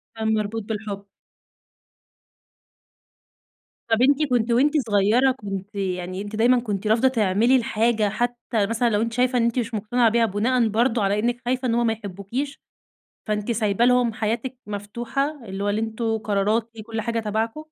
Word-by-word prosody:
كان 220 0 0
مربوط 215 +1 -2
بالحب. 205 -2 -5 2.8
طب 225 +1 +2
أنتِ 285 +3 +4
كنتِ 240 -1 +1
وأنتِ 280 +6 +3 0.2
صغيّرة 215 +6 +4
كنتِ 200 -4 -6
يعني 185 -1 -3
أنتِ 205 +1 -6
دايمًا 240 +3 +4
كنتِ 210 -3 -3
رافضة 225 +4 +4
تعملي 225 +1 +3
الحاجة 225 -3 +1
حتى 240 -1 -1
مثلًا 230 +1 +1
لو 210 -1 +1
أنتِ 230 0 -2
شايفة 250 +1 +2
إن 235 - +2
أنتِ 235 +2 +1
مش 230 0 -3
مقتنعة 225 +3 +2
بيها 230 +1 +3
بناءً 225 +3 +1
برضو 230 +1 +1
على 200 +1 +1
إنِّك 240 +2 -1
خايفة 255 +1 0
إن 230 - +1
هو 240 - +2
ما 225 -1 +2
يحبوكيش، 220 +7 -5 0.7
فأنتِ 210 +1 -1
سايبة 220 0 +1
لهم 250 -2 +3
حياتِك 230 +4 -2
مفتوحة، 235 +7 -3
اللي 195 -1 -5
هو 205 - 0
اللي 205 +1 0
أنتم 225 0 -2
قراراتي 215 +2 -1
كُلّ 225 0 -4
حاجة 230 +1 -1
تبعكُم؟ 220 +7 -2
225 Hz, 165 wpm, -23 LUFS, 210-240 Hz, 2.8 s, أنتِ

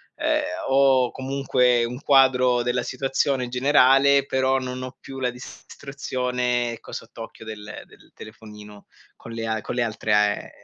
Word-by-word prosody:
ehm, - - 0 0.3
ho 135 -2 +3
comunque 130 -2 +1
un 125 +2 -4
quadro 130 -3 +4
della 120 0 -1
situazione 135 0 -1
generale, 135 +1 +4
però 130 0 +1
non 130 0 -6
ho 130 0 -8
più 135 0 -9
la 125 -1 0
distruzione, 125 -1 -4
ecco, 115 - -12
sott'occhio 115 0 -9
del 105 -1 -8
del - - -21
telefonino 105 -1 -13 0.3
con 115 - -12
le 115 0 -5
a 110 -1 -2
con - - -6
le 125 - 0
altre 110 -1 -2
a 105 0 +5
ehm, - - -9
125 Hz, 150 wpm, -23 LUFS, 115-135 Hz, 0.3 s, a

